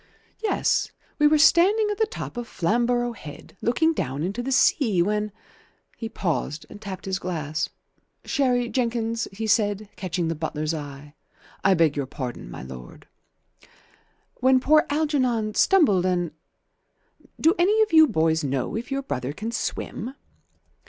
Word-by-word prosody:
"Yes. 440 - +1 0.3
We 300 - +6
were 305 +1 +4
standing 390 +8 +5
at 415 - -4
the 440 - +3
top 435 - -7
of 240 -1 -5
Flamborough 240 +6 0
Head, 150 -9 -11
looking 320 +8 +2
down 140 - -3
into 200 +7 -2
the 265 +2 -3
sea, 240 - +3
when 210 +2 -1 0.3
" - - -37
He 225 - -4
paused 165 -7 -2
and 210 - -11
tapped 195 -3 -7
his 190 0 -2
glass, 155 -3 -3 0.6
"Sherry, 250 -4 +1
Jenkins," 230 -2 -1
he 215 +3 -5
said, 210 -1 +1
catching 175 -2 -2
the 165 - 0
butler's 155 0 -3
eye. 145 -1 -8 0.5
"I 195 -1 +5
beg 165 -4 +3
your 140 -2 -2
pardon, 125 - -6
my - - -8
lord." 65 -1 -11 0.7
" - - -33
When 260 0 +5
poor 305 +4 +4
Algernon 260 -8 0
stumbled 210 - +4
and 175 -2 0 1.1
Do 325 +2 +4
any 420 +5 +4
of 430 - -4
you 315 -1 +8
boys 160 - +1
know 135 +2 -2
if 230 +4 -4
your 275 0 -2
brother 130 - -3
can 220 +8 -5
swim?" 240 +2 -4
215 Hz, 155 wpm, -24 LUFS, 165-265 Hz, 1.1 s, you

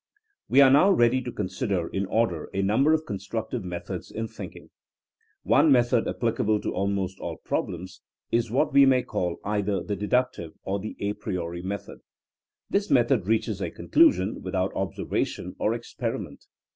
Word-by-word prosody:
We 135 - +6
are 135 -1 +7
now 150 +8 +6
ready 130 -8 +4
to 120 - -5
consider 95 -3 -2
in 95 0 -2
order 95 -7 0
a 95 - +1
num 105 +7 +2
ber 155 - +5
of 160 0 0
constructive 110 +3 -4
methods 90 -1 -6
in 115 0 -4
thinking. 110 - -10 0.7
One 155 - +4
method 120 -2 +3
applicable 110 -2 0
to - - -3
almost 95 -1 -2
all - - -5
problems 90 +2 -3 0.3
is 115 -1 +1
what 140 +5 +1
we 140 -1 +7
may 130 -1 +4
call 90 -1 -2
either 105 -1 0
the 105 - -3
dedtictive 105 -5 -1
or 100 +1 -2
the 110 +3 -6
a 100 0 0
priori 90 -5 -4
method. 100 +2 -6 0.7
This 200 +1 0
method 120 -6 +3
reaches 110 -2 0
a - - -1
con - - -11
clusion 325 0 +4
without - - -2
observation - - -3
or - - +1
experiment. - - -5
110 Hz, 165 wpm, -26 LUFS, 95-125 Hz, 0.7 s, are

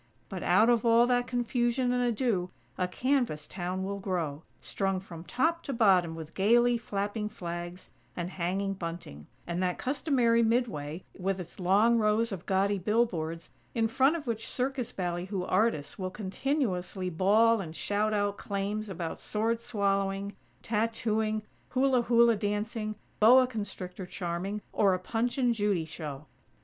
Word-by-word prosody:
But 185 - -5
out 205 +6 +4
of 235 -2 +3
all 230 0 +5
that 245 0 +1
confusion 245 +1 0
and 250 - +1
ado 225 -6 0 0.3
a 180 - 0
canvas 240 - 0
town 185 0 -3
will 200 +1 -3
grow, 170 -7 -2 0.2
strung 195 -1 -1
from 170 -3 -10
top 325 - 0
to 275 - -3
bottom 185 -8 +3
with 160 -1 -8
gaily 240 +5 +4
flapping 210 -1 -3
flags 175 -1 -7 0.2
and 175 +1 -4
hanging 190 +3 -1
bunting, 165 - -7 0.2
and 175 +1 -2
that 180 -1 0
customary 255 -4 +2
"mid 235 +2 +3
way" 150 -2 -6 0.2
with 190 +1 -1
its 175 +1 -9
long 210 +6 +4
rows 215 +1 +2
of 185 -3 -6
gaudy 195 +1 +2
billboards, 175 -6 -1 0.2
in 225 -1 +2
front 265 +7 +3
of 320 - -5
which 225 -3 -3
circus 255 -1 -2
ballyhoo 180 +1 -3
artists 185 -7 0
will 185 -1 -2
continuously 190 -3 -2
bawl 215 +6 +4
and 160 -3 -7
shout 210 +4 0
out 205 -1 0
claims 205 +2 -3
about 170 -3 -4
sword 225 +2 -1
swallowing, 200 -3 -1 0.3
tattooing, 220 -1 0 0.3
hula 260 -1 +3
hula 235 -1 +5
dancing, 215 +1 -2 0.2
boa 250 +4 +7
constrictor 195 -6 -6
charming, 185 +4 -4
or 195 -3 +4
a - - -4
Punch 230 +6 -1
and 245 -3 +3
Judy 205 -6 0
show. 150 -2 -7
205 Hz, 150 wpm, -29 LUFS, 180-235 Hz, 0.3 s, boa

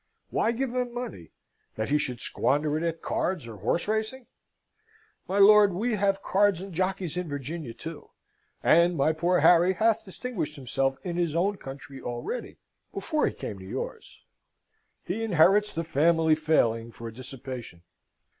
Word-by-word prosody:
Why 230 - +2
give 245 +1 -2
him 250 -1 -2
money? 170 - -6 0.5
That 110 +3 -3
he 150 +1 +3
should 125 -5 -4
squander 150 +2 0
it 155 - -1
at 165 -1 -2
cards 180 -8 -1
or 110 -2 -9
horse 110 - -1
racing? 220 +4 -2 1.0
My 190 - -1
lord, 205 -1 +7
we 225 +7 -1
have 195 -1 +1
cards 200 -2 +3
and 190 0 -8
jockeys 185 -1 -1
in 180 -3 -3
Virginia, 145 -2 -5
too; 165 +2 -9 0.5
and 170 +1 +4
my 150 +3 +3
poor 175 +3 +1
Harry 175 +2 +6
hath 220 +3 +2
distinguished 190 -6 -5
himself 135 0 -1
in 175 -2 -3
his 170 -3 0
own 195 +4 +1
country 135 -2 -9
already, 120 - -5 0.3
before 310 -2 0
he - - -2
came 100 - -6
to - - -10
yours. - - -6 0.8
He 215 +5 -2
inherits 205 +1 +4
the 165 - -3
family 160 +1 +3
failing 120 -8 +1
for 115 0 -8
dissipation." 125 -6 -9
170 Hz, 155 wpm, -27 LUFS, 135-200 Hz, 1.0 s, lord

